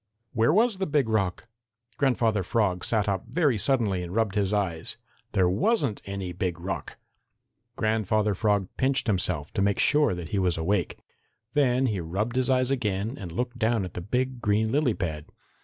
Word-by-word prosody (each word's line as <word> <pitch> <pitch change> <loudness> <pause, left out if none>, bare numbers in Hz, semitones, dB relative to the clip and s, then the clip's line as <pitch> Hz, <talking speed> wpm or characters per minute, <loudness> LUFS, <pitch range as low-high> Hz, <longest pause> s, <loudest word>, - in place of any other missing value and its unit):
Where 115 +2 +3
was 215 +2 +3
the 190 - 0
Big 145 -5 +2
Rock? 110 -1 -1 0.5
Grandfather 120 -6 +2
Frog 95 -2 0
sat 110 -2 +1
up 100 +1 -1
very 145 0 +2
suddenly 105 -6 +1
and 90 +2 -6
rubbed 110 -3 +1
his 100 -2 +1
eyes. 95 -6 -1 0.4
There 95 -2 +3
wasn't 140 - +1
any 100 -2 -4
Big 90 -1 -3
Rock! 85 -4 -5 0.8
Grandfather 110 -1 +1
Frog 100 -1 +1
pinched 135 0 +1
himself 90 -8 -1
to - - 0
make 100 0 +2
sure 145 -9 +3
that 85 -2 -7
he 100 - 0
was 90 -3 +1
awake. 90 +2 0 0.6
Then 135 -3 +3
he 105 -6 0
rubbed 95 +8 -2
his 130 0 +1
eyes 130 0 +2
again 110 -2 -1
and 95 -10 -7
looked 120 +6 -3
down 110 -3 +1
at 90 - -8
the 90 - -5
big 125 +6 -2
green 110 +1 +1
lily 140 -4 +2
pad. 80 -5 -4
105 Hz, 175 wpm, -26 LUFS, 95-125 Hz, 0.8 s, Where